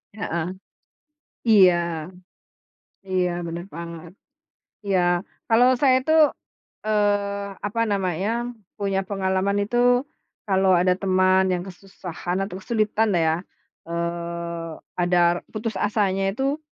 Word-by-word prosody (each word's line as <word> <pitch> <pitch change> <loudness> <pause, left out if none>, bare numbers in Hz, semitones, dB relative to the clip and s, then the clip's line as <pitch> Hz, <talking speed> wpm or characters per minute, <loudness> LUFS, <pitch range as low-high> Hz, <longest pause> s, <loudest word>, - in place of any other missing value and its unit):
Heeh. 170 -5 -2 1.1
Iya. 190 -5 +7 1.3
Iya, 185 -1 +1 0.2
benar 170 +1 -5
banget. 170 0 -8 0.7
Iya. 195 -2 +2 0.5
Kalau 235 +2 +5
saya 260 -2 +5
itu, 265 +5 -2 0.7
eee, 205 -1 0 0.2
apa 230 +3 -2
namanya, 190 0 0 0.5
punya 195 -2 0
pengalaman 195 0 0
itu, 235 +4 -2 0.7
kalau 190 -1 +3
ada 180 +1 +3
teman 185 0 +3
yang 175 - -2
kesusahan 180 -1 -6
atau 190 -1 -6
kesulitan 220 0 +1
lah 175 - +2
ya. 160 - +2 0.5
Eee, 170 0 -4 0.3
ada 175 0 +3 0.3
putus 220 0 -4
asanya 200 -2 +1
itu 275 +7 -2
190 Hz, 105 wpm, -23 LUFS, 175-205 Hz, 1.3 s, Iya